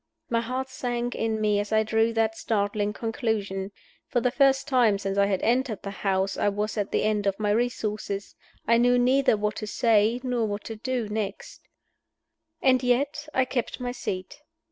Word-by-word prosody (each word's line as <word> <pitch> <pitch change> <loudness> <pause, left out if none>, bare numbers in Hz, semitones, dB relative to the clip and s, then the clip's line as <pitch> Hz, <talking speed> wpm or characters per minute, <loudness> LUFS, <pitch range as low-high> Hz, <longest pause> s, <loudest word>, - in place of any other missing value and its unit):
My 230 -1 +2
heart 255 +3 -3
sank 245 -2 -3
in 220 -1 -1
me 210 -1 +2
as 205 +1 -3
I 220 0 +4
drew 225 +1 +2
that 225 -1 +1
startling 205 -1 -1
conclusion. 210 -4 -2 0.4
For 250 - +1
the 245 +1 +1
first 270 +1 +3
time 245 -7 +3
since 195 0 -3
I 200 0 +3
had 195 -2 -1
entered 240 -2 +1
the 200 - -4
house 195 -1 -1
I - - +2
was 210 +2 -2
at 205 -2 -2
the - - +1
end 210 -1 +1
of 195 +1 0
my 210 -1 +1
resources; 215 -3 -2 0.3
I 230 +1 +5
knew 245 +1 +4
neither 255 -1 +3
what 210 0 -2
to 215 - -4
say 225 +1 +3
nor 245 -3 0
what 205 0 -4
to 225 - -6
do 240 0 -2
next. 210 -1 -5 1.0
And 255 -1 +4
yet 275 +4 0
I 260 - +3
kept 250 -1 -3
my 245 -1 -3
seat. 195 +1 -5
220 Hz, 190 wpm, -26 LUFS, 205-245 Hz, 1.0 s, I